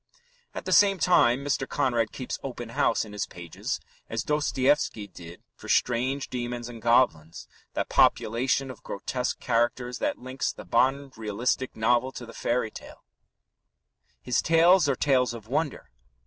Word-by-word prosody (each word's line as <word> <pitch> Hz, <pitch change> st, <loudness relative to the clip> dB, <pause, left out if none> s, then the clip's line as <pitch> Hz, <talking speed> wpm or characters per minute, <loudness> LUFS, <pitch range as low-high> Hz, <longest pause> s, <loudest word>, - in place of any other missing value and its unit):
At -, -, -6 dB
the -, -, -3 dB
same 200 Hz, -1 st, +6 dB
time, 140 Hz, -7 st, +3 dB
Mr. 135 Hz, -2 st, -1 dB
Conrad 120 Hz, -6 st, 0 dB
keeps 130 Hz, -, -5 dB
open 120 Hz, -3 st, -6 dB
house 115 Hz, 0 st, +1 dB
in 105 Hz, -, -11 dB
his 105 Hz, -, -3 dB
pages 85 Hz, -1 st, -5 dB, 0.3 s
as -, -, -2 dB
Dostoevsky 145 Hz, -6 st, +1 dB
did 85 Hz, -2 st, -12 dB
for -, -, -12 dB
strange 130 Hz, +3 st, +1 dB
demons 120 Hz, -1 st, -4 dB
and 115 Hz, -2 st, -9 dB
goblins 110 Hz, -10 st, +2 dB, 0.3 s
that -, -, -1 dB
population 130 Hz, +4 st, +2 dB
of 125 Hz, -, -13 dB
grotesque 125 Hz, +5 st, -3 dB
characters 120 Hz, +1 st, 0 dB
that -, -, -1 dB
links 130 Hz, +1 st, -3 dB
the -, -, -11 dB
modern 135 Hz, +3 st, +1 dB
realistic 115 Hz, +4 st, -2 dB
novel 120 Hz, +3 st, +2 dB
to 120 Hz, -, -7 dB
the 115 Hz, -, -12 dB
fairy 120 Hz, -2 st, -1 dB
tale. -, -, -12 dB, 1.2 s
His 125 Hz, -, 0 dB
tales 165 Hz, 0 st, +5 dB
are 135 Hz, -, +2 dB
tales 125 Hz, -3 st, +2 dB
of 110 Hz, -2 st, -11 dB
wonder. 145 Hz, -, -2 dB
125 Hz, 150 wpm, -27 LUFS, 115-135 Hz, 1.2 s, same